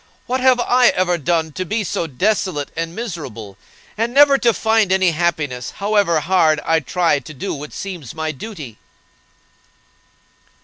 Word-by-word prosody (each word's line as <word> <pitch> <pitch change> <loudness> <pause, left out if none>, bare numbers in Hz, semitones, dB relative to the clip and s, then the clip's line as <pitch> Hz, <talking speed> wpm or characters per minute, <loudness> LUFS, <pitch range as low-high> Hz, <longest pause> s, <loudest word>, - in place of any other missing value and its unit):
What 255 +1 -2
have 255 -1 +4
I 245 0 +4
ever 180 -1 +1
done 160 +1 0
to 185 - -4
be 210 +4 -2
so 170 -3 -2
desolate 180 0 -1
and 165 +1 -4
miserable, 140 - -7 0.4
and 230 +2 -1
never 280 -1 +6
to 235 - +3
find 220 -3 +1
any 190 -2 +3
happiness, 150 -7 -2
however 200 -6 +1
hard 165 -3 +2
I 165 0 +3
try 160 +1 +1
to 140 +3 -11
do 190 +9 -4
what 150 +1 -7
seems 175 - -7
my 160 0 -2
duty?" 150 - -9
175 Hz, 150 wpm, -19 LUFS, 155-210 Hz, 0.4 s, never